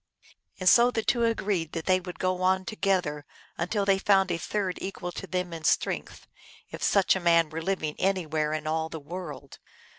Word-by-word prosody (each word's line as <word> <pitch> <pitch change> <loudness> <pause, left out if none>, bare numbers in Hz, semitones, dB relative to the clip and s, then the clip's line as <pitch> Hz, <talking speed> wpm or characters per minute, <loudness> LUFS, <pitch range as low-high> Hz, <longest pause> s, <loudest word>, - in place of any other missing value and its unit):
And 185 - -2
so 240 +5 +7
the 225 -3 -2
two 235 +1 +2
agreed 195 -8 -1
that 165 -1 -4
they 185 -1 +3
would 180 -1 -8
go 185 0 -1
on 185 0 +2
to 215 - -5
gether 180 -8 0 0.3
until 200 +4 -1
they 195 -1 +3
found 195 -2 +3
a 170 - -1
third 190 +1 -2
equal 185 -2 -5
to 195 - -7
them 180 0 -3
in 165 -1 -7
strength, - - -1 0.5
if - - -8
such 195 -2 +3
a - - -1
man 170 -2 +3
were 160 +1 -4
living 160 -4 -2
anywhere 160 -6 0
in 155 0 -3
all 160 +1 -1
the 160 - -6
world. 145 -3 -8
180 Hz, 200 wpm, -27 LUFS, 160-195 Hz, 0.5 s, so